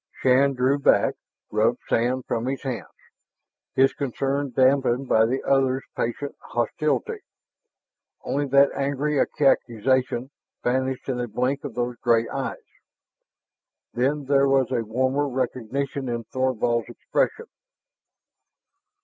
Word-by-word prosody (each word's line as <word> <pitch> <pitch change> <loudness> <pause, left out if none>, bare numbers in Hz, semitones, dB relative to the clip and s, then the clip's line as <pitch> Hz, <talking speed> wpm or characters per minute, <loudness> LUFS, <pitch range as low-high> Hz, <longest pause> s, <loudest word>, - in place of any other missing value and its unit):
Shann 135 +2 +3
drew 130 +3 +2
back, - - +3 0.4
rubbed - - +2
sand 125 +2 0
from 115 +2 -2
his 135 +1 -3
hands, 130 -4 -4 0.9
his 135 +1 +4
concern 140 +1 -2
dampened 130 0 +2
by 110 -1 +4
the 130 +3 -2
other's 135 -1 +2
patent 130 +5 -3
hostility. 155 - -1 1.0
Only 145 +1 -1
that 140 +1 +5
angry 140 +1 -1
accusation 130 -1 +1 0.3
vanished 130 +1 -1
in 130 -2 -2
a 120 - -2
blink 125 +5 -1
of 140 -6 -6
those 120 0 -2
gray 115 -1 +2
eyes. 135 -1 -5 1.3
Then 140 +4 0
there 140 0 +3
was 135 -2 +2
a 120 -3 0
warmer 130 +6 0
recognition 130 +1 -3
in 120 -1 -3
Thorvald's 120 -1 -1
expression. 470 -2 -1
130 Hz, 115 wpm, -24 LUFS, 120-140 Hz, 1.3 s, that